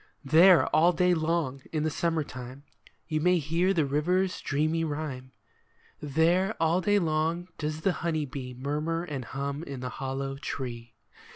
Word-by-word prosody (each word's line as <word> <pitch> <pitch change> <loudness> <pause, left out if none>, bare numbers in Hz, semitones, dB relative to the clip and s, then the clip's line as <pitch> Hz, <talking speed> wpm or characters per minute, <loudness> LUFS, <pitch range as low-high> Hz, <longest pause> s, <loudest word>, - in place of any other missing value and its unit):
There 165 +5 +7
all 170 +3 +5
day 180 +1 +3
long, 160 -5 -1
in 155 -2 -1
the 155 - 0
summer 165 0 0
time, 130 0 -9 0.4
You 155 -2 -1
may 180 +2 +4
hear 165 +4 +1
the 165 -6 +2
river's 180 +7 0
dreamy 155 +3 0
rhyme; 145 -4 -4 0.7
There 170 +8 +2
all 165 +3 +2
day 205 +3 +3
long 165 0 0
does 155 0 -3
the 195 - +2
honey 160 -3 0
bee 125 -2 -7
Murmur 150 +6 -2
and 145 -6 -5
hum 140 +3 -4
in 140 -5 -7
the 125 - -3
hollow 135 +2 -4
tree. 120 -5 -6
155 Hz, 160 wpm, -28 LUFS, 140-170 Hz, 0.7 s, There